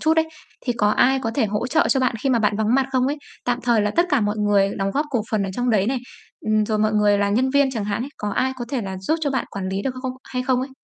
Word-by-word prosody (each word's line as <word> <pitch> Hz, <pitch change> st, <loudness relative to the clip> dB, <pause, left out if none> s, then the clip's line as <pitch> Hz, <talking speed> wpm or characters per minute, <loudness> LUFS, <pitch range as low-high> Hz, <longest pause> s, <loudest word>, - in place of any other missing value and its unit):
chút 315 Hz, +1 st, +2 dB
ấy, 320 Hz, 0 st, +2 dB, 0.4 s
thì 245 Hz, -, +2 dB
có 210 Hz, -3 st, +2 dB
ai 265 Hz, +5 st, +3 dB
có 225 Hz, -, -1 dB
thể 240 Hz, -4 st, +2 dB
hỗ 210 Hz, +3 st, -2 dB
trợ 315 Hz, +5 st, +2 dB
cho 270 Hz, -, +2 dB
bạn 255 Hz, -2 st, +1 dB
khi 275 Hz, -, +1 dB
mà 245 Hz, -, +3 dB
bạn 210 Hz, -2 st, +1 dB
vắng 220 Hz, +2 st, +1 dB
mặt 270 Hz, -1 st, +3 dB
không 255 Hz, -1 st, +2 dB
ấy? 285 Hz, +2 st, -1 dB, 0.3 s
Tạm 245 Hz, 0 st, 0 dB
thời 235 Hz, -3 st, +3 dB
là 210 Hz, 0 st, +1 dB
tất 345 Hz, +1 st, +4 dB
cả 285 Hz, -4 st, +3 dB
mọi 210 Hz, 0 st, 0 dB
người 205 Hz, -1 st, +3 dB
đóng 195 Hz, 0 st, 0 dB
góp 290 Hz, +7 st, -1 dB
cổ 240 Hz, -5 st, 0 dB
phần 215 Hz, -2 st, +1 dB
ở 195 Hz, -, -2 dB
trong 245 Hz, +2 st, 0 dB
đấy 205 Hz, -3 st, +2 dB
này, 260 Hz, +2 st, 0 dB, 0.5 s
ừm, 215 Hz, 0 st, +3 dB
rồi 215 Hz, -1 st, 0 dB
mọi 215 Hz, 0 st, +2 dB
người 210 Hz, -1 st, +3 dB
là 200 Hz, 0 st, +1 dB
nhân 255 Hz, +6 st, +2 dB
viên 280 Hz, 0 st, +3 dB
chẳng 225 Hz, -5 st, -3 dB
hạn 205 Hz, +2 st, -2 dB
ấy, 275 Hz, -, -6 dB
có 210 Hz, -, -3 dB
ai 260 Hz, +5 st, 0 dB
có 240 Hz, -, -3 dB
thể 260 Hz, -1 st, -1 dB
là 190 Hz, -1 st, -5 dB
giúp 190 Hz, +12 st, 0 dB
cho 295 Hz, -3 st, 0 dB
bạn 265 Hz, -, -1 dB
quản 190 Hz, -1 st, -4 dB
lý 195 Hz, +1 st, -2 dB
được 260 Hz, +2 st, -2 dB
không 260 Hz, -1 st, -2 dB
hay 250 Hz, -1 st, -3 dB
không 255 Hz, -1 st, +1 dB
ấy? 265 Hz, +2 st, -4 dB
235 Hz, 320 wpm, -22 LUFS, 210-265 Hz, 0.5 s, tất